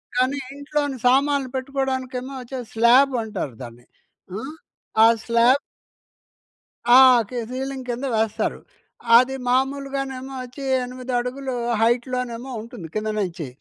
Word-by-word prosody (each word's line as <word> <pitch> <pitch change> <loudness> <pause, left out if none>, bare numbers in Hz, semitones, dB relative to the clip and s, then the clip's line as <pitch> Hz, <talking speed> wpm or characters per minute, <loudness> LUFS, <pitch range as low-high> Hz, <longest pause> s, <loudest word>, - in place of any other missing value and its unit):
కానీ, 255 +3 +1 0.2
ఇంట్లోని 285 -1 -2
సామాన్లు 275 +1 +2
పెట్టుకోడానికేమో, 260 -1 -3
వచ్చది 250 -1 -7
స్లాబంటారు 235 - +2
దాన్ని. 120 0 -12 0.5
ఆ! - - -6 0.6
ఆ - - +9 0.2
స్లాబ్ 235 +4 +4 1.4
ఆ‌! 260 - +10 0.3
కే 250 - -6
సీలింగ్ 265 0 -5
కింద 245 +3 -3
వేస్తారు. 220 -1 -1 0.6
అది 255 +2 +3
మామూలుగానేమో 270 0 -1
వచ్చీ, 255 +3 -10 0.2
ఎనిమిదడుగులు 250 +1 -3 0.3
హైట్‌లోనేమో 245 +1 -1
ఉంటుంది, 225 -7 -9
కింద 215 0 -1
నుంచి. 175 -6 -3
255 Hz, 100 wpm, -23 LUFS, 235-270 Hz, 1.4 s, ఆ‌